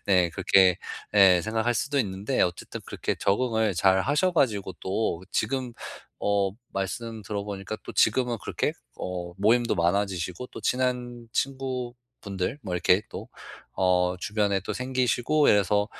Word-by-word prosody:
네 90 -3 +3
그렇게 95 0 +4 0.3
네 95 -4 +6
생각할 110 +2 0
수도 140 +4 0
있는데 100 +2 -1
어쨌든 90 -1 -1
그렇게 - - -2
적응을 110 0 +1
잘하셔가지고 105 - +2
또 95 -3 -1
지금 125 +1 -1 0.5
어 100 -1 +1 0.2
말씀 110 +4 -4
들어보니까 100 0 -5
또 - - -7
지금은 120 +1 +2
그렇게 - - -1 0.3
어 90 -1 -4
모임도 115 +4 +3
많아지시고 90 +3 -1
또 - - -10
친한 125 -2 -1
친구분들 125 -5 -3
뭐 95 -5 -4
이렇게 90 +2 +3
또 - - -7 0.5
어 90 -1 +3
주변에 100 0 0
또 95 - -4
생기시고 130 +3 +1
이래서 105 +1 +3
105 Hz, 295 characters per minute, -26 LUFS, 95-120 Hz, 0.5 s, 네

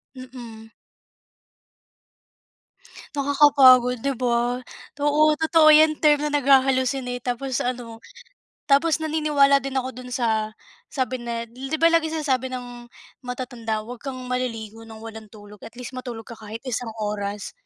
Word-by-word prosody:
Mm. 235 -4 -11 2.4
Nakakapagod 270 -4 +5
'di 275 -3 -2
ba? 245 0 0 0.5
Oo, 300 +1 +3
totoo 320 -1 +4
yan 310 0 +7
term 300 -1 +5
na 295 - -3
nagha-hallucinate 260 -2 +2
tapos 250 +1 -3
ano, 240 -2 -5 0.7
tapos 315 +3 +3
naniniwala 300 -3 +3
din 275 0 -5
ako 255 - -5
dun 250 0 -9
sa 220 -3 -1 0.4
sabi 260 -2 -1
na, 235 -1 -5
di 265 +5 -8
ba 330 - +6
laging 320 -1 +1
sinasabi 260 -3 -1
ng 245 -1 -8 0.4
matatanda 240 -3 -4
wag 245 +3 -9
kang 255 -1 -7
maliligo 225 -3 -4
ng 220 -1 -12
walang 220 -1 -9
tulog 205 0 -13
at 225 - -11
least 250 0 -8
matulog 240 -3 -7
ka 230 - -10
kahit 220 +2 -9
isang 235 -1 -4
oras. 205 -1 -4
250 Hz, 135 wpm, -23 LUFS, 230-275 Hz, 2.4 s, yan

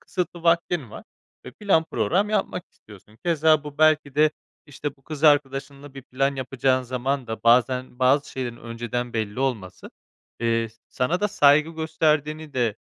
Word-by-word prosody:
kısıtlı 180 -2 -4
vaktin 170 -6 +1
var - - -10 0.4
ve - - -8
plan 190 -6 +1
program 195 +5 0
yapmak 195 -3 -1
istiyorsun. 105 +1 -18
Keza 155 -2 +3
bu 150 0 -9
belki 155 -3 +3
de, 150 +1 +4 0.4
işte, 145 0 -6
bu 135 - -30
kız 155 +1 -6
arkadaşınla 140 -1 +1
bir 135 - -9
plan 135 +2 -1
yapacağın 130 0 0
zaman 130 +1 -2
da 110 0 -6
bazen 125 +1 +2
bazı 135 +3 +2
şeylerin 125 -3 -5
önceden 120 +1 -5
belli 110 +1 -3
olması, 110 -9 -3 0.5
eee, 115 -1 0
s 110 - -25
sana 150 +9 -1
da 210 - +1
saygı 150 -1 +4
gösterdiğini 155 -1 -1
de, 120 -5 0
140 Hz, 160 wpm, -24 LUFS, 125-155 Hz, 0.5 s, de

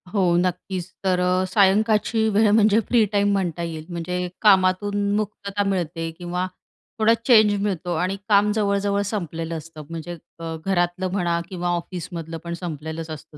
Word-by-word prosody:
हो 200 - +2 0.2
नक्कीच, 180 0 -2
तर 185 -2 +2
अ, 180 +1 +2
सायंकाळची 210 +3 +3
वेळ 210 +1 +3
म्हणजे 215 0 +5
फ्री 235 -2 +4
टाईम 205 -1 +2
म्हणता 175 -3 -1
येईल 160 -2 -5
म्हणजे 180 +1 -3
कामातून 200 0 +3
मुक्तता 205 -1 -2
मिळते 165 -3 -2
किंवा 180 +1 -3 0.5
थोडा 220 +1 +5
चेंज 215 -4 +6
मिळतो 180 -3 -2
आणि 185 +4 0
काम 205 0 +4
जवळ-जवळ 200 -1 +1
संपलेलं 165 -5 -3
असतं 160 -1 -10
म्हणजे 165 +1 -6 0.2
अ, 165 -1 -4
घरातलं 180 -1 0
म्हणा 175 -3 0
किंवा 180 -2 -3
ऑफिसमधलं 170 -2 -4
पण 170 0 -5
संपलेलंच 160 -1 -6
असतं 155 0 -9
185 Hz, 150 wpm, -23 LUFS, 170-205 Hz, 0.5 s, चेंज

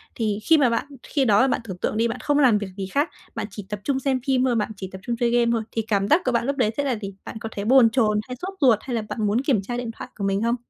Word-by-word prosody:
thì 215 -3 -1
khi 325 - +5
mà 275 -5 +4
bạn 230 +2 -1 0.2
khi 275 -3 0
đó 210 -2 +5
là 260 - +4
bạn 255 - 0
tưởng 190 -5 -7
tượng 215 - -2
đi, 230 +1 +2
bạn 230 - -4
không 290 0 +1
làm 250 -7 +5
việc 205 -1 -4
gì 195 -1 -3
hác, 290 +3 +2 0.3
bạn - - -3
chỉ 205 0 -8
tập 210 -1 -4
trung 270 +1 0
xem 265 -1 0
phim 260 -2 +3
thôi, 250 -2 +1
bạn 215 -1 -1
chỉ 190 -1 -6
tập 190 - -9
trung 240 - -2
chơi 235 0 +1
game 235 -1 +3
thôi, 230 -2 0
thì 225 - -1
cảm 205 -3 0
giác 310 - +4
của 255 - +2
bạn 235 -1 +1
lúc 280 +1 -1
đấy 225 -5 +2
sẽ 285 - +1
là 270 -3 0
gì? 200 -3 -7
Bạn 220 - -7
có 225 - -5
thấy 200 -1 -5
bồn 250 0 +6
chồn 220 -3 +2
hay 250 - -5
sốt 380 +2 -4
ruột? 240 -6 +5
Hay 255 -2 -4
là 225 - 0
bạn 220 - -2
muốn 215 +5 +1
kiểm 265 -7 +1
tra 240 +5 -4
điện 245 -2 -4
thoại - - -8
của 200 - -6
mình 195 +1 0
không? 235 +1 +2
235 Hz, 335 wpm, -23 LUFS, 210-260 Hz, 0.3 s, bồn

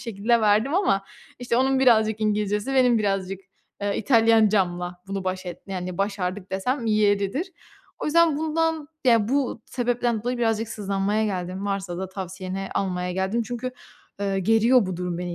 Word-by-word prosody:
şekilde 230 +1 +1
verdim 215 +8 +3
ama, 195 - +2 0.3
işte, 245 -1 -1
onun 265 +1 +2
birazcık 220 -4 +4
İngilizcesi 210 +3 0
benim 250 -3 +4
birazcık, 195 -2 -1 0.4
eee, 205 0 0
İtalyancamla 210 -7 +2
bunu 195 -1 -4
baş 185 0 -3
et 175 -1 -6
yani, 185 -2 -5
başardık 195 -1 -2
desem 235 +6 -1
yeridir. 210 - +1 0.5
O - - -5
yüzden 325 0 +4
bundan, 320 -1 -1 0.2
ya 230 -3 +4
bu 265 -4 -1
sebepten 240 -2 -1
dolayı 245 +1 -2
birazcık 225 -1 0
sızlanmaya 200 +1 -1
geldim, 185 -1 -3
varsa 195 -3 -3
da 190 - -4
tavsiyeni 190 0 -5
almaya 180 -2 -1
geldim 190 +5 0
çünkü, 245 +2 -5 0.5
eee, 195 -1 0
geriyor 225 +3 +4
bu 185 -2 -4
durum 180 -1 -3
beni 175 -1 -4
210 Hz, 155 wpm, -24 LUFS, 190-240 Hz, 0.5 s, birazcık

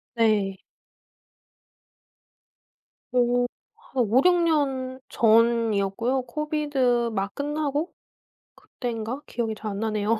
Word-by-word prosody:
네. 210 -4 +2 2.5
어. 245 0 +2 0.3
한 255 -2 -2
5-6년 270 - +2
전이었고요. 230 +1 +2
코비드 270 -4 0
막 195 -1 -2
끝나고 295 +2 -2 0.7
그땐가 240 +2 -5
기억이 225 -2 -2
잘 215 0 -5
안 200 - -4
나네요. 215 0 0
240 Hz, 160 characters per minute, -25 LUFS, 220-275 Hz, 2.5 s, 네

